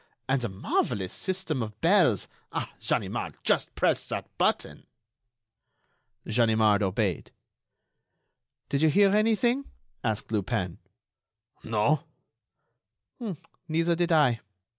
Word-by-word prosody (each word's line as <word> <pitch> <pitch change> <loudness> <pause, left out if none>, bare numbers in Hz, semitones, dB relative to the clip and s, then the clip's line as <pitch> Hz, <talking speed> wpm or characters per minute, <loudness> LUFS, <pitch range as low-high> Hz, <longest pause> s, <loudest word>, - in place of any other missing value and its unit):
And 135 0 +1
the 120 - -2
marvellous 95 0 -1
system 185 -8 -2
of 110 -1 -6
bells! 165 - +4 0.2
Ah! - - -3
Ganimard, - - -1
just - - +1
press - - +1
that - - -5
button!" - - 0 1.4
Ganimard 110 -2 +3
obeyed. 95 -2 -1 1.4
"Did 140 - 0
you 160 - +5
hear 200 +5 +5
anything?" 235 +5 +2 0.4
asked 110 -1 -2
Lupin. 95 -4 -1 0.8
"No." 115 +7 +1 1.6
"Neither 165 +2 +1
did 175 0 0
I. 145 -8 +4
125 Hz, 95 wpm, -27 LUFS, 105-170 Hz, 1.6 s, you